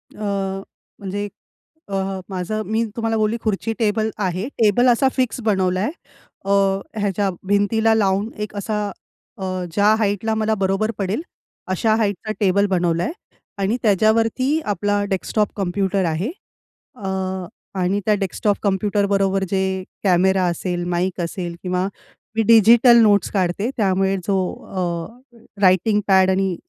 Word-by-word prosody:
अ, 195 -2 -2 0.4
म्हणजे 205 +1 -4 0.6
अ, 195 - -3 0.3
माझं 190 +3 -3
मी 220 +2 0
तुम्हाला 225 -1 -1
बोलली 215 +2 +1
खुर्ची 220 +1 -1
टेबल 220 0 +1
आहे. 190 +1 -1
टेबल 225 +3 +4
असा 245 +3 +4
फिक्स 255 -2 0
बनवलाय. 190 -1 +1 0.6
अ, 200 - -1 0.5
ह्याच्या 200 -1 0 0.2
भिंतीला 220 +3 +2
लावून 200 0 +1 0.2
एक 210 - -15
असा 210 0 -2 0.5
अ, 190 - -3 0.3
ज्या 205 +2 +3
हाईटला 210 +1 0
मला 220 0 +1
बरोबर 195 +3 0
पडेल 200 +7 -1 0.5
अशा 215 +4 +2
हाईटचा 215 -1 -1
टेबल 200 0 +3
बनवलाय 175 - 0 0.5
आणि 200 +5 +1
त्याच्यावरती 225 - +2
आपला 205 0 0
डेस्कटॉप 205 +2 0
कॉम्प्युटर 195 0 0
आहे. 170 - -1 0.6
अ, 200 -5 -7 0.7
आणि 185 +2 +1
त्या 215 - +3
डेस्कटॉप 200 +1 -1
कॉम्प्युटर 200 +1 +1
बरोबर 195 -1 +1
जे 190 0 0 0.4
कॅमेरा 190 0 +3
असेल, 175 +1 -2
माईक 180 +1 -1
असेल 170 0 -4
किंवा 180 +1 0 0.5
मी 225 - +2
डिजिटल 230 +2 +7
नोट्स 205 -4 +3
काढते. 195 +4 0
त्यामुळे 195 -1 +2
जो 195 -1 +2 0.3
अ, 195 +8 -5 0.2
रायटिंग 200 +3 +4
पॅड 190 -1 +5
आणि 190 -1 0
200 Hz, 130 wpm, -21 LUFS, 190-220 Hz, 0.7 s, डिजिटल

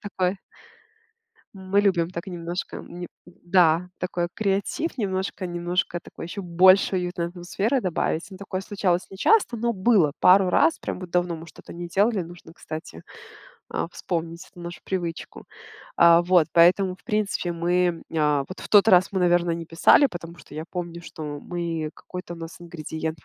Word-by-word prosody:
такое 190 -2 -1 1.2
Мы 190 +1 +1
любим 180 -4 +1
так 170 +1 -6
немножко, 175 0 -5
неп 175 0 -8 0.2
да, 175 -1 +2
такой 175 -1 -2
креатив, 205 - -1
немножко, 190 -2 -2
немножко 175 0 -2
такой, 165 - -10
ещё 200 +3 -6
больше 185 +2 +5
уютной 175 -1 -2
атмосферы 195 +8 -1
добавить. 175 -1 -1
Ну, 190 - -9
такое 190 -1 -5
случалось 190 -3 -1
нечасто, 245 - +2
но 235 +1 0
было 190 -7 +3
пару 185 0 +6
раз. 160 -2 +3
Прям - - -5
вот 180 -2 -8
давно 175 -1 0
мы 165 +1 -9
что-то 155 - -13
не 175 0 -7
делали. 200 +2 +2
Нужно, 175 -1 -13
кстати, 155 - -8 0.7
э, - - -2
вспомнить 170 +1 -4
эту 175 - -13
нашу 175 0 -8
привычку. 175 -3 -4 0.6
Э, 170 0 +7
вот, 180 -4 +5
поэтому 180 +3 +5
в 185 - -23
принципе 205 -4 -1
мы, 175 0 +1
э, 150 -3 +1
вот 185 - -9
в - - -8
тот 210 +1 +6
раз, 185 -2 +6
мы, 190 - 0
наверно, 175 -1 +3
не 170 - -5
писали, 170 - +5
потому 170 -6 -8
что 145 - -14
я 155 - -5
помню, 170 -2 -5
что 160 - -9 0.3
мы 165 -3 -3
какой-то 180 -1 -8
у - - -13
нас 165 +1 -9
ингредиент, 160 -2 -6
175 Hz, 165 wpm, -24 LUFS, 170-190 Hz, 1.2 s, Э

